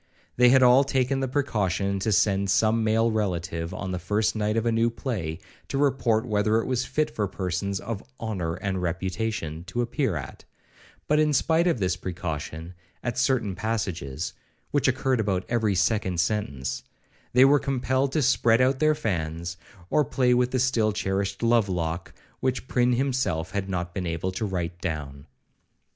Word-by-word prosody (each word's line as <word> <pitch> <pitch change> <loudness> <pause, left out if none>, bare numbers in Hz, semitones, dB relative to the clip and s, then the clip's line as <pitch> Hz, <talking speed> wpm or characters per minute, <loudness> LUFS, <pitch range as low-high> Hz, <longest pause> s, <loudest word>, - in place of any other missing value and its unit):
They 125 0 +6
had 130 +1 +6
all 125 +2 +7
taken 135 0 0
the 135 - -1
precaution 100 - 0
to 110 +3 0
send 100 -1 +2
some 110 +3 +3
male 115 +1 +2
relative, 85 -6 -2
on 95 -2 -4
the 90 - -2
first 105 +6 0
night 105 +1 0
of 115 - 0
a 115 - +2
new 115 +1 +2
play, 105 - -4 0.3
to 135 - -3
report 130 -5 +2
whether 110 +1 +2
it - - -2
was 130 -1 0
fit 150 +3 -1
for 105 -2 -1
persons 95 +1 -2
of 110 -2 -5 0.2
'honour 95 -8 -2
and 95 0 -3
reputation' 90 -2 -3
to 120 +6 -1
appear 120 - -1
at; 70 -2 -7 0.6
but 150 +1 +3
in 150 -1 +3
spite 165 +5 +3
of 170 - +2
this 90 -4 0
precaution, 85 -2 -5 0.3
at 120 -1 -2
certain 125 -6 +1
passages 90 -8 -3 0.4
(which 145 -2 +2
occurred 130 0 +1
about 95 -4 0
every 110 -4 +1
second 95 -1 +1
sentence) 85 -9 -1 0.5
they 125 +2 +7
were 145 +1 +5
compelled 135 0 0
to 155 - +2
spread 120 -3 +4
out 130 +1 +3
their 155 0 +3
fans, 85 - -3 0.4
or 150 - +4
play 125 -1 +2
with 125 0 +2
the 130 - -1
still 120 -4 +2
cherished 95 0 -2
love 115 -3 +3
lock, 85 -1 -2 0.3
which 130 -1 -1
Prynne 125 -1 +2
himself 125 -10 0
had 100 -1 -3
not 90 -2 -3
been 95 -3 -3
able 85 +3 -2
to 105 +3 -3
write 90 -2 -3
down. 75 -5 -5
110 Hz, 175 wpm, -26 LUFS, 90-125 Hz, 0.6 s, all